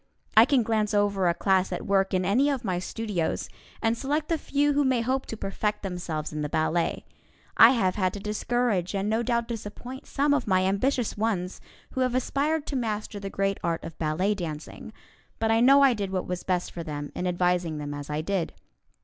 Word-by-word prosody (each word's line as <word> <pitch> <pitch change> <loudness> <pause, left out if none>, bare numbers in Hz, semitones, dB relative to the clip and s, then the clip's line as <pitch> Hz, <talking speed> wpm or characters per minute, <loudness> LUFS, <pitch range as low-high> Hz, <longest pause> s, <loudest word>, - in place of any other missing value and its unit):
I 220 +1 +9
can 265 -2 +3
glance 215 -1 0
over 200 -2 +2
a 170 - +1
class 190 +1 +2
at - - -4
work 195 -1 +2
in 185 -1 +1
any 250 +10 +3
of 265 -4 -2
my 180 -3 0
studios, 195 -3 -2 0.3
and 225 +1 +2
select 295 +5 -2
the 330 - +2
few 290 +1 +1
who 290 +1 +3
may 260 -3 +2
hope 260 +3 -1
to 225 - -5
perfect 210 +1 -2
themselves 175 -5 -4
in 150 - -3
the 150 - -2
ballet. 160 +3 0 0.5
I 225 - +9
have 190 -7 +1
had 185 -3 0
to 205 - -5
discourage 210 -2 -1
and 195 +1 -1
no 220 +2 +1
doubt 235 -1 0
disappoint 240 +4 -7
some 285 +1 +1
of 285 - 0
my 185 -1 +3
ambitious 230 +5 0
ones 195 -5 -1 0.3
who 260 - -2
have 255 -1 +1
aspired 285 +4 0
to 280 - -4
master 215 -4 -3
the 195 0 -5
great 195 0 -1
art 165 -1 -1
of 165 - -7
ballet 165 +6 +1
dancing; 165 -6 -6 0.5
but 225 0 +1
I 225 - +4
know 275 +4 +6
I 270 -2 +6
did 205 -4 -3
what 185 -1 -2
was 180 0 -3
best 180 -1 -1
for 170 - -6
them 145 -2 -5
in 180 - -2
advising 180 -2 0
them 145 -1 -5
as 145 0 -7
I 150 +1 -1
did. 180 +1 -2
205 Hz, 210 wpm, -27 LUFS, 180-240 Hz, 0.5 s, I